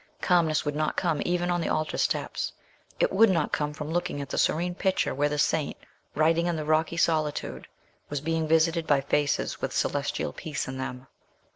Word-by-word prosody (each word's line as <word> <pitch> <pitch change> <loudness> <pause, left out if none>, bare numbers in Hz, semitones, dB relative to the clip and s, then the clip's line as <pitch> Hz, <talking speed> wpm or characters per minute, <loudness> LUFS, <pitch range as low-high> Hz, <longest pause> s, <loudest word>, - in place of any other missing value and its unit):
Calmness 165 -4 +2
would 145 0 -1
not 155 0 -1
come 165 -5 +1
even 175 0 0
on 175 0 0
the - - -1
altar 155 0 -1
steps; - - -1 0.5
it - - +3
would 220 +3 +6
not 165 -5 +1
come 150 0 0
from 150 +1 -6
looking 175 -3 -1
at 140 -1 -5
the - - -3
serene 175 +3 +1
picture 190 +1 0
where 145 +2 +1
the 150 - -2
saint, 150 0 +1 0.4
writing 165 +2 +3
in 175 - 0
the 155 -1 -3
rocky 155 +2 +1
solitude, 155 -3 0 0.4
was 145 - -2
being 160 +2 -1
visited 165 +1 +2
by 140 -2 +4
faces 145 +1 0
with - - -2
celestial 75 - -1
peace 155 - -4
in 130 0 -5
them. 125 0 -5
155 Hz, 190 wpm, -27 LUFS, 150-170 Hz, 0.5 s, would